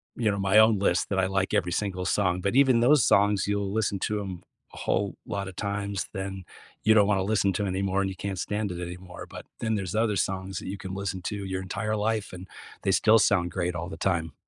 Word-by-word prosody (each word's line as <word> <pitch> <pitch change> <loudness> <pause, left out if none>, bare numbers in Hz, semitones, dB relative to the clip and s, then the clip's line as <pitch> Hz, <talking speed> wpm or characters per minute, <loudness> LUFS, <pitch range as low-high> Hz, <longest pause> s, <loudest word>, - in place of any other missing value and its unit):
you 115 -4 +1
know, 100 - -2
my 95 +1 +3
own 110 -2 +5
list 95 -2 +1
that 100 - 0
I 95 - +3
like 95 0 -1
every 90 0 +1
single 95 -1 -2
song, 90 -1 +1
but 100 +5 -1
even 130 -3 +5
those 135 +1 +5
songs, 100 -1 +3
you'll 100 -1 -1
listen 100 -3 0
to 105 +1 -1
'em 95 -3 -7 0.3
a - - -12
whole 100 0 -1
lot 100 -3 -3
of 95 - -9
times, 100 -1 -3
then 95 0 -5 0.4
you 110 - +5
don't 105 -2 +5
want 100 -2 +2
to 95 - 0
listen 100 -1 +1
to 100 +3 -1
anymore 95 0 0
and 95 - 0
you 95 - -6
can't 95 0 -4
stand 105 +1 -2
it 90 - -5
anymore, 90 +1 -8
but - - -9
then 110 -2 0
there's 95 -1 -3
other 110 -1 +2
songs 95 0 -2
that - - -9
you 100 +2 -4
can 95 -1 -7
listen 95 -1 -3
to 100 -1 -4
your 95 0 -3
entire 105 +3 -2
life, 110 0 -1
and 90 +1 -9 0.4
they 95 - +2
still 110 +3 +5
sound 95 -4 +2
great 90 0 -2
all 85 0 -4
the 80 - -7
time. 85 -5 -1
100 Hz, 245 wpm, -27 LUFS, 95-105 Hz, 0.4 s, own